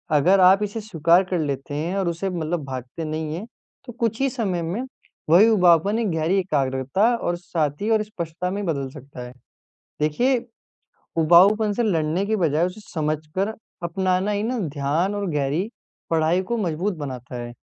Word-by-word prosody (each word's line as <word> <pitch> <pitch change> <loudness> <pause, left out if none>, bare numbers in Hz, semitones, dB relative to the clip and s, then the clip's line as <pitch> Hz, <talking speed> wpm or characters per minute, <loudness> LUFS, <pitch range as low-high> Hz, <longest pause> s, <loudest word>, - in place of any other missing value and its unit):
अगर 180 +7 +4
आप 190 +2 +6
इसे 210 +2 -3
स्वीकार 175 -2 +3
कर 180 -1 -2
लेते 140 -2 -3
हैं 165 +6 -2
और 190 -3 0
उसे 170 +3 -2
मतलब 170 -2 -2
भागते 130 +4 -6
नहीं 155 0 -3
है 195 +6 -6 0.4
तो 245 - -9
कुछ 230 0 0
ही 275 - +3
समय 200 -9 -2
में 175 +9 -3 0.5
वही 185 +7 +7
उबाऊपन 190 +1 +4
एक 220 -4 0
गहरी 160 +4 +1
एकाग्रता 135 -1 0
और 175 -6 -2
साथी 170 +2 -2
और 220 -1 +3
स्पष्टता 180 -3 -5
में 200 +1 -3
बदल 140 -6 -2
सकता 140 -3 -11
है। 125 - -12 0.7
देखिए, 240 - +2 0.8
उबाऊपन 195 +6 +5
से 240 - 0
लड़ने 170 -2 0
की 220 +2 0
बजाय 165 -3 +2
उसे 185 +4 -6
समझकर 155 +6 -2 0.3
अपनाना 185 +3 0
ही 205 +1 -1
ना 245 +1 -1
ध्यान 150 +8 -1
और 205 -1 -2
गहरी 150 +8 -1 0.4
पढ़ाई 165 +2 +2
को 235 - +1
मज़बूत 185 0 -1
बनाता 130 -4 -6
है। 120 - -8
175 Hz, 170 wpm, -23 LUFS, 155-205 Hz, 0.8 s, वही